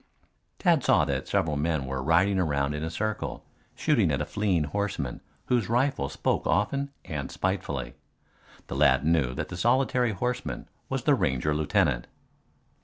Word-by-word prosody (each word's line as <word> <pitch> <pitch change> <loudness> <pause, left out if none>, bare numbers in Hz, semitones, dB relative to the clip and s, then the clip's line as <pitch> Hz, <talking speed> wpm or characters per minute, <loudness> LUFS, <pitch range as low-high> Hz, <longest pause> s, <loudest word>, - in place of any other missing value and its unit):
Tad 170 -8 +3
saw 85 -5 +4
that 70 -2 -2
several 75 -2 0
men 75 -2 0
were 65 0 -3
riding 90 +7 +3
around 70 -4 0
in 75 +1 -4
a 80 - -2
circle 110 +5 -3 0.3
shooting 120 - +2
at 70 - 0
a 75 - -1
fleeing 95 -5 0
horseman 75 -5 -3 0.2
whose 120 -3 +1
rifle 125 - +1
spoke - - -1
often 140 +7 +1 0.2
and 70 -4 -4
spitefully. - - -2 0.7
The - - -6
lad - - +4
knew 75 -6 +2
that - - -4
the 90 - -6
solitary 125 +1 +2
horseman 125 +5 -3 0.2
was - - -2
the - - +4
Ranger 65 +3 +1
lieutenant. 75 -5 +1
85 Hz, 155 wpm, -27 LUFS, 70-115 Hz, 0.7 s, saw